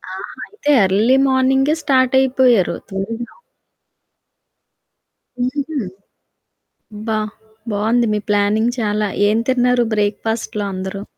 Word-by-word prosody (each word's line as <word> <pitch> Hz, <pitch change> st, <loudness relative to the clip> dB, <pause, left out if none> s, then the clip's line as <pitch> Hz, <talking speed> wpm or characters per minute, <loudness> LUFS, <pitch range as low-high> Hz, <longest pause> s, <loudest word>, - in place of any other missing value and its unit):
ఆహా! -, -, -8 dB
అయితే, 400 Hz, -8 st, -5 dB
ఎర్లీ 215 Hz, +8 st, +3 dB
మార్నింగే 265 Hz, +3 st, +2 dB
స్టార్ట్ 260 Hz, -3 st, +2 dB
అయిపోయారు 255 Hz, -7 st, +3 dB
త్వరగా. 225 Hz, +5 st, -5 dB, 2.1 s
హుహు. 280 Hz, +4 st, -2 dB, 1.2 s
అబ్బా! 215 Hz, +1 st, -2 dB, 0.5 s
బావుంది 225 Hz, +3 st, +1 dB
మీ 210 Hz, -, 0 dB
ప్లానింగ్ 210 Hz, +3 st, +2 dB
చాలా. 210 Hz, -1 st, 0 dB, 0.2 s
ఏం 215 Hz, +2 st, +2 dB
తిన్నారు 250 Hz, -1 st, +2 dB
బ్రేక్‌ఫాస్ట్‌‌లో 210 Hz, 0 st, -2 dB
అందరూ? 190 Hz, +2 st, -5 dB
230 Hz, 90 wpm, -18 LUFS, 210-260 Hz, 2.1 s, ఎర్లీ